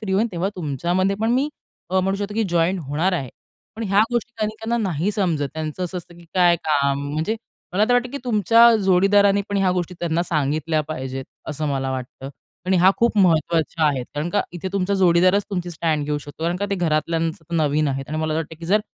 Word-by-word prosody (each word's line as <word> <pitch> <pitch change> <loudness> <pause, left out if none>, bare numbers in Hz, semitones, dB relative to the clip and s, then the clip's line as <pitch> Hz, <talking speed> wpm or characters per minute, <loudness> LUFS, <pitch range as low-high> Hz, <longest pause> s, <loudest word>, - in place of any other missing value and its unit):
Free 195 -3 -3
होईन 210 +4 +3
तेव्हा 175 +3 -1
तुमच्यामध्ये 175 +5 0
पण 225 +1 +1
मी 265 +4 +2 0.4
अ, 190 0 +3
म्हणू 195 +1 0
शकतो, 205 +1 -4
की 225 - +1
जॉइन 175 +2 +2
होणार 160 +5 -1
आहे. 140 -7 -2 0.5
पण 225 - -4
ह्या 200 +2 +4
गोष्टी 240 0 -1
अनेकांना 225 +2 -2
नाही 175 +4 -1
समजत. 165 -9 0
त्यांचं 160 +3 -3
असं 180 +1 -4
असतं, 175 0 -12
की 175 - -15
काय 175 -2 +5
काम? 140 -3 0
म्हणजे 160 +9 -1 0.4
मला 205 +3 +3
तर 245 - +3
वाटतं, 245 0 +2
की 280 - -5
तुमच्या 230 +1 +5
जोडीदारानी 200 +1 +4
पण 205 - -1
ह्या 190 -2 +2
गोष्टी 180 0 -2
त्यांना 170 0 0
सांगितल्या 155 0 0
पाहिजेत, 135 -3 -5 0.2
असं 150 0 -2
मला 135 -1 -1
वाटतं. 130 +1 -6 0.4
आणि 190 - +3
ह्या 185 +2 +6
खूप 235 -2 +1
महत्त्वाच्या 165 -2 +2
आहेत. 135 -4 0
कारण 150 +3 -2
का 205 - +1
इथे 175 +2 -5
तुमचा 200 0 0
जोडीदारच 185 +2 +4
तुमची 180 -3 -3
स्टँड 160 -3 -1
घेऊ 150 0 -1
शकतो. 145 +2 -11
कारण 175 +1 0
का 205 +2 -2
ते - - +2
घरातल्यांच 165 -1 0
ते 165 +1 -8
नवीन 150 -1 +2
आहेत. 135 0 -3
आणि 155 +1 -3
मला 155 0 -1
तर - - 0
वाटतं, 160 0 -5
की 165 - -8
जर 210 +4 +3
175 Hz, 215 wpm, -22 LUFS, 155-195 Hz, 0.5 s, ह्या